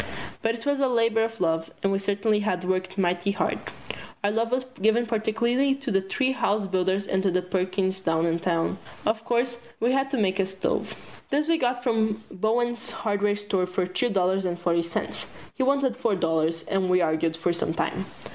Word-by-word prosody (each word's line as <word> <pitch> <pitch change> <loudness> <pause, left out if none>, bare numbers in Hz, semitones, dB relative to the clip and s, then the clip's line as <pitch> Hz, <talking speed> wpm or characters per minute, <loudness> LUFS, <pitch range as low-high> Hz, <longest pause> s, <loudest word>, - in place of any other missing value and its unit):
But 225 0 +1
it 230 - -9
was 285 -1 +1
a 275 - +3
labor 230 -2 +2
of 225 0 -3
love, 165 -2 +1
and 195 - +2
we 195 - +1
certainly 205 +2 +1
had 185 -4 -1
worked 185 +1 -1
mighty 180 0 +1
hard. 205 - 0 0.6
Our 205 - +2
love 230 +2 0
was 255 0 0 0.2
given 220 +3 +3
particularly 235 +4 +1
to 270 -3 -4
the 195 -1 +3
three 260 +8 0
house 210 -5 +1
builders 190 +1 0
and 190 -1 0
to 185 -2 +2
Perkins, 190 +1 -1
down 165 -2 +1
in 165 0 +1
town. 170 +1 0 0.3
Of 220 +1 +1
course 240 0 0 0.2
we 235 +2 +2
had 270 +1 +1
to 270 - -1
have 190 -2 +1
a 195 - +3
stove. 190 0 -2 0.3
This 295 +2 +1
we 330 -1 +3
got 245 -1 0
from 220 -3 +1
Bowen's 235 +4 0
hardware 205 -1 0
store 200 -3 -1
for 180 0 -1
two 185 +7 0
dollars 190 -1 +2
and 175 -1 -1
forty 170 -1 +2
cents. 170 0 -4 0.3
He - - -4
wanted 270 -2 +2
four 235 -5 +1
dollars, 165 -1 0
and 195 -2 +1
we 180 0 +4
argued 160 0 +1
for 170 +1 +1
some 165 -1 -2
time. 190 +3 -2
200 Hz, 200 wpm, -26 LUFS, 185-235 Hz, 0.6 s, we